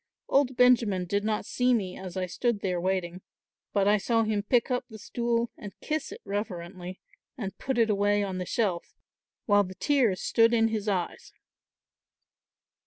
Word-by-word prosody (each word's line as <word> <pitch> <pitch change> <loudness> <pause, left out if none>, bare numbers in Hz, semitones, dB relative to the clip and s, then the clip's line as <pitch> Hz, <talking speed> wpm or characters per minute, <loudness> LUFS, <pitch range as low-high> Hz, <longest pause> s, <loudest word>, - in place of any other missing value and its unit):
Old 265 -2 +2
Benjamin 230 -7 +4
did 200 +3 -1
not 215 -1 -1
see 250 +2 +2
me, 190 -5 -2
as 190 -1 -7
I 185 - 0
stood 215 +4 -1
there 180 -3 -1
waiting, 185 -1 -2 0.5
but 200 -1 +2
I 210 0 +4
saw 225 +2 +2
him 215 -2 0
pick 240 +5 +1
up 250 - 0
the 220 - -10
stool 235 +2 -1
and 205 -1 -10
kiss 310 0 -3
it - - -9
reverently 185 -3 -5 0.4
and 200 -5 -5
put 265 -2 -2
it 225 -2 +3
away 205 0 +2
on 190 -2 -3
the 180 - -3
shelf, 195 -7 -1 0.5
while 205 -1 +4
the 185 0 -8
tears 225 -2 +2
stood 230 +1 +3
in 225 -1 +3
his 215 -1 -3
eyes." 185 -4 -2
205 Hz, 175 wpm, -28 LUFS, 185-235 Hz, 0.5 s, Benjamin